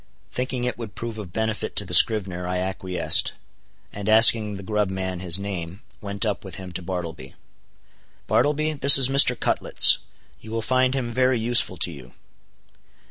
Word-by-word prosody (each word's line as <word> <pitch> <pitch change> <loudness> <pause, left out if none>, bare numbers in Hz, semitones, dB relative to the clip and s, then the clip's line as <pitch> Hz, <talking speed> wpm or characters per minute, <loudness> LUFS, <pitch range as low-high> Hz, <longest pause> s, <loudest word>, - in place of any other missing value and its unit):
Thinking 125 0 -5
it 125 -1 -5
would 115 -3 -10
prove 115 -2 -8
of 95 -5 -10
benefit 110 +2 -5
to - - -1
the - - -9
scrivener, 95 -5 +4
I 90 0 -4
acquiesced; 95 0 0 0.6
and 100 +1 -7
asking 110 -1 +4
the 100 - -11
grub 105 -1 -3
man 95 -1 -6
his 90 -1 0
name, 95 -1 -8 0.2
went 100 +1 -4
up 105 -2 -4
with 95 -3 -10
him 95 -1 -10
to 90 - -7
Bartleby. 85 -7 -8 0.9
"Bartleby, 155 +1 -1
this 140 -1 +7
is 135 -1 +4
Mr. 135 -3 +4
Cutlets; - - +5 0.4
you 110 - -15
will 115 0 -5
find 130 +2 -1
him 120 -3 -4
very 130 0 0
useful 115 -5 0
to 85 - -1
you." 65 -5 -14
105 Hz, 170 wpm, -21 LUFS, 95-120 Hz, 0.9 s, this